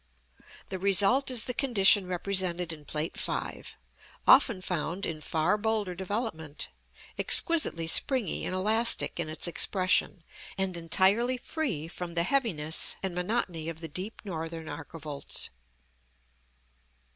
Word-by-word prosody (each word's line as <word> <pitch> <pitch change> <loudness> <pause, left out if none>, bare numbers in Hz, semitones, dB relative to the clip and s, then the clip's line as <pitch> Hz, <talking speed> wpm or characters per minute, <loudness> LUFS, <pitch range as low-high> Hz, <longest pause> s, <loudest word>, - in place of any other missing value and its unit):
The 190 - -5
result 200 +8 +4
is 250 -3 +2
the 250 - -2
condition 205 -7 +3
represented 180 -2 -1
in 150 -2 -13
Plate 155 +3 -4
V., - - -2 0.6
often 255 -6 +5
found 180 +1 -3
in 155 -2 -5
far 160 +7 0
bolder 215 -3 -1
development; 185 - -5 0.5
exquisitely 305 - +4
springy 225 - +3
and 185 - -3
elastic 220 +1 +3
in 165 -2 -3
its 160 +3 +1
expression, 185 0 +1 0.3
and 190 -2 -1
entirely 195 +9 +2
free 240 - -4
from 170 0 -8
the 170 - +1
heaviness 175 - 0
and 190 -2 -3
monotony 180 -3 -2
of 165 -1 -8
the 165 - -6
deep 185 +8 -7
northern 165 -3 -6
archivolts. 150 -2 -3
185 Hz, 120 wpm, -28 LUFS, 165-215 Hz, 0.6 s, often